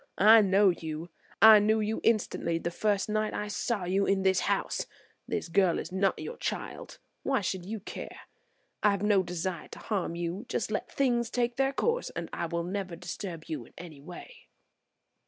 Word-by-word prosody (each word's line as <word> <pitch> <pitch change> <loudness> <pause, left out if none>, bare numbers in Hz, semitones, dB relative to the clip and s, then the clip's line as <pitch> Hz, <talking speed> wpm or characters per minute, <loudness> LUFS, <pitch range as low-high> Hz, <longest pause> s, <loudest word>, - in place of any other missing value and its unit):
I 220 +3 +8
know 200 0 +4
you; 160 -1 -4 0.3
I 220 -1 +10
knew 215 +2 +2
you 215 +1 -1
instantly 200 -6 +1
the 170 +1 -3
first 205 +2 0
night 215 0 -1
I 210 - -3
saw 210 0 -2
you 190 +3 +1
in 195 -1 +2
this 190 -1 +3
house. - - -1 0.4
This - - -2
girl 175 0 +3
is - - -5
not 190 0 +1
your 475 - -6
child; - - -5 0.2
why 270 -4 +1
should 185 -2 -3
you 220 +1 -4
care. - - -8 0.6
I 210 - +5
have 200 0 -1
no 205 -2 +4
desire 180 -1 -4
to - - -11
harm 195 -5 -2
you. 175 +7 -4
Just 215 - -2
let 210 - -3
things 240 -4 +1
take 240 -1 0
their 270 +1 +2
course 470 - 0
and - - -5
I 170 - -2
will 170 0 -2
never 185 0 -4
disturb 175 -1 -6
you 155 -7 -5
in - - -20
any 160 -5 -10
way." 180 - -12
195 Hz, 190 wpm, -29 LUFS, 175-215 Hz, 0.6 s, I